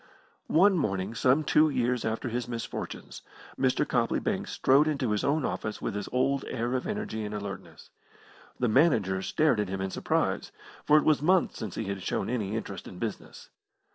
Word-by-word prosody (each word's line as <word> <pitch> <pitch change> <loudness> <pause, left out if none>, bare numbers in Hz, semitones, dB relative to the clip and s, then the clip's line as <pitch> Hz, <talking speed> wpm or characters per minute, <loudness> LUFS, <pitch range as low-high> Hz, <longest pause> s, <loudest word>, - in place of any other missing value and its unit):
One 185 +2 +4
morning, 95 -5 -1
some 130 +6 +3
two 155 +1 +4
years 125 -3 0
after 115 +2 -2
his 120 0 -3
misfortunes, 115 -2 -6 0.3
Mr. - - +1
Copley - - +1
Banks - - -2
strode 140 +4 +4
into 140 -7 0
his 105 - 0
own 145 0 +1
office 110 - -3
with - - -3
his 105 0 -4
old 135 +2 +1
air 120 0 -2
of 130 - -1
energy 210 - -3
and 105 0 -4
alertness. 100 -2 -8 0.7
The 125 - +1
manager 110 - +3
stared 150 +2 +2
at 105 -3 -1
him 95 0 -3
in 95 0 -2
surprise, - - -1 0.3
for 150 - +6
it 150 - +3
was 155 -3 +3
months 180 +4 +2
since 110 -6 -5
he - - -2
had 100 -2 -4
shown - - -2
any 110 -4 -2
interest 100 -3 -5
in 90 - -10
business. 110 +1 -6
120 Hz, 185 wpm, -28 LUFS, 105-145 Hz, 0.7 s, for